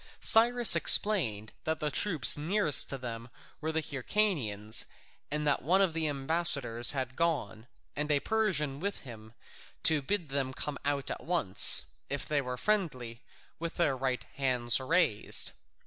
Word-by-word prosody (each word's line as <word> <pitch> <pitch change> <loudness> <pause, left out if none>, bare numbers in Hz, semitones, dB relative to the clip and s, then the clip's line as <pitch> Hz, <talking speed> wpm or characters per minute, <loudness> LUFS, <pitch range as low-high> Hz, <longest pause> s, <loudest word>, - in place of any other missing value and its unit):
Cyrus 235 +1 +5
explained 115 - +2
that 160 0 -3
the 150 -1 -3
troops 155 - +5
nearest 160 +2 +1
to 135 - -5
them 120 -1 -8 0.3
were 160 +1 -3
the 160 0 -3
Hyrcanians, 130 - -2 0.4
and 150 +1 -3
that 145 - 0
one 180 +8 +1
of 190 -4 +1
the 160 -1 -2
ambassadors 140 -5 +2
had 130 -2 -5
gone, 135 - -3 0.3
and 150 +1 -3
a 145 - +2
Persian 165 -10 -2
with 200 +4 -5
him, 110 -4 -13 0.5
to 155 -2 +3
bid 175 +1 -4
them 135 -1 -4
come 150 -1 -6
out 140 -2 -2
at - - -7
once, 160 - +4 0.2
if 140 0 -4
they 150 -2 -1
were 125 -1 -6
friendly, 130 - -3 0.4
with 170 0 -6
their 150 -6 0
right 130 -1 -3
hands 125 -3 +1
raised. 135 - +1
145 Hz, 150 wpm, -29 LUFS, 125-170 Hz, 0.5 s, Cyrus